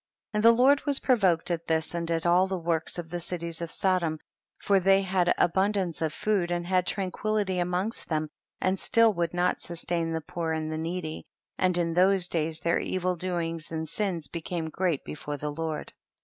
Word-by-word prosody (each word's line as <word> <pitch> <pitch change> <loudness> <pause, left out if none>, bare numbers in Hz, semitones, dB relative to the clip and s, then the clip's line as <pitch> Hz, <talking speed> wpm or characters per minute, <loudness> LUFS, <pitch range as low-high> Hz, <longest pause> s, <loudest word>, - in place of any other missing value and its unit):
44. 210 - -2
And 210 - +1
the 230 +1 +6
Lord 280 +1 +4
was 280 -1 +3
provoked 185 -9 +2
at 170 -1 -3
this 160 0 0
and 170 -1 -3
at 165 0 -1
all 180 +2 +4
the 190 0 -2
works 165 -1 -1
of 165 -2 -6
the 175 - -3
cities 170 -1 -4
of 170 - -3
Sodom, 180 -5 0 0.4
for 200 -1 +2
they 195 +1 +4
had 185 -2 +2
abun 190 +4 +2
dance 185 -6 -2
of 160 -2 0
food 195 0 0
and 175 0 -1
had 185 0 +1
tranquility 195 0 -1
amongst 180 +5 -2
them, 155 -1 0 0.3
and 185 0 0
still 230 -1 +4
would 170 -2 -1
not 180 +1 +1
sustain 170 -1 -2
the 160 - -1
poor 170 -1 -3
and 155 0 -3
the 155 - -3
needy, 165 -1 -4 0.3
and 180 -1 +3
in 170 -1 0
those 185 +1 +5
days 160 -1 -1
their 170 -1 +1
evil 185 -1 -1
doings 165 -2 -3
and 160 0 -3
sins 175 -5 -2
became 165 0 -4
great 175 -6 -1
before 145 -1 -5
the 150 +1 -3
Lord. 160 0 -4
175 Hz, 200 wpm, -27 LUFS, 165-190 Hz, 0.4 s, the